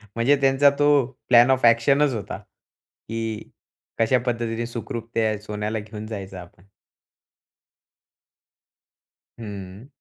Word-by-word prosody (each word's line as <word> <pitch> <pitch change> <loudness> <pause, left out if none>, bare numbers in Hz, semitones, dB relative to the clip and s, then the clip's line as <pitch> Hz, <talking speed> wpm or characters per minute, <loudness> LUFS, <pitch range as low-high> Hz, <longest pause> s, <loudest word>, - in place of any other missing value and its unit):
म्हणजे 120 +5 +3
त्यांचा 135 +1 +5
तो 145 0 +4 0.4
प्लॅन 120 +1 +6
ऑफ 130 -2 +2
एक्शनच 135 +5 +4
होता, 105 -4 -5
की 115 -1 -9 0.5
कशा 115 +3 +3
पद्धतीने 115 -1 -2
सुखरूप 115 -1 -6
त्या 110 -2 0
सोन्याला 105 +1 -4
घेऊन 105 0 -9
जायचं 100 -3 -7
आपण. 90 +1 -14 2.7
हं. 100 0 -9
115 Hz, 100 wpm, -23 LUFS, 105-120 Hz, 2.7 s, प्लॅन